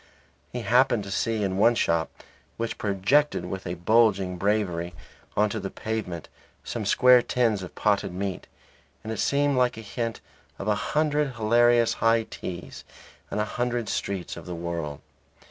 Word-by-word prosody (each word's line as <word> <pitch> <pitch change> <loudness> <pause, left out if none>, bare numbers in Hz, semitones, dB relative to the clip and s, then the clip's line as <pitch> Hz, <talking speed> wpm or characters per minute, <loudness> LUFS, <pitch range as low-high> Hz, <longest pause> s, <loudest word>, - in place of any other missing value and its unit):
He 125 - -4
happened 120 0 +3
to 100 - -7
see 110 +1 0
in 95 -1 -1
one 120 +3 +5
shop 85 -7 +1 0.5
which 115 0 -3
projected 105 +3 +2
with 95 +1 -5
a 85 - -3
bulging 100 -1 +3
bravery 90 -4 -1 0.4
on 105 +1 +4
to 110 - -2
the 95 -1 -4
pavement 105 -8 -4 0.4
some - - -4
square 125 -1 +6
tins 115 -5 +1
of 90 - -9
potted 100 -2 +1
meat, 95 +1 -4 0.6
and 110 +1 -4
it 110 - -6
seemed 140 -1 +2
like 125 -2 +2
a - - -6
hint 115 +1 -4 0.4
of 100 - -6
a 105 - +4
hundred 150 +4 0
hilarious 120 +1 +4
high 115 0 +4
teas 90 -4 -8 0.5
in - - -2
a 105 - +1
hundred 120 0 -2
streets 95 -3 -3
of - - -10
the 90 - -4
world. 85 -4 -4
105 Hz, 165 wpm, -26 LUFS, 95-120 Hz, 0.6 s, square